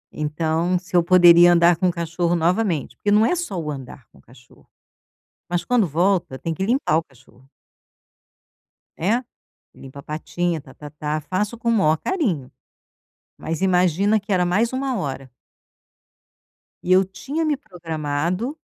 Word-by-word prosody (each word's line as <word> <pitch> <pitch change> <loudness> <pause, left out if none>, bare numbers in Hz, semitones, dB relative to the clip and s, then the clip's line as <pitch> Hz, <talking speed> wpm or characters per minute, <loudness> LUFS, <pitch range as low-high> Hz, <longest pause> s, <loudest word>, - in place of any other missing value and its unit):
então, 160 +4 -1
se 180 0 -7
eu 175 - +6
poderia 175 -1 +7
andar 170 0 +5
com 185 - +1
o - - +2
cachorro 170 0 -1
novamente. 170 - 0
Porque 205 - -2
não 210 +2 +5
é 360 - +1
só 330 - -4
o 150 -2 -4
andar 130 -2 -9
com - - -21
o - - -20
cachorro, 120 0 -21 0.8
mas 175 -1 -1
quando 245 -5 +2
volta 170 -3 0
tem 165 +3 -3
que 190 - -3
limpar 235 - +1
o - - -1
cachorro. 130 -1 -23 1.5
Né, 225 +9 0 0.5
limpa 135 +1 -11
a - - -18
patinha, 165 +3 -3
ta-ta-tá. 150 +2 -6
Faço 200 +9 -3
com 235 - -3
o - - +4
maior 160 -8 +3
carinho, 185 - -2 0.9
mas 165 +1 -5
imagina 185 +2 +2
que 200 - -5
era 180 -2 +2
mais 210 +7 +1
1 260 0 -2
hora. 135 -4 -5 1.5
E 180 - -2
eu 190 +1 +5
tinha 270 - -4
me 300 - +1
programado 175 - -4
175 Hz, 155 wpm, -22 LUFS, 155-200 Hz, 1.5 s, poderia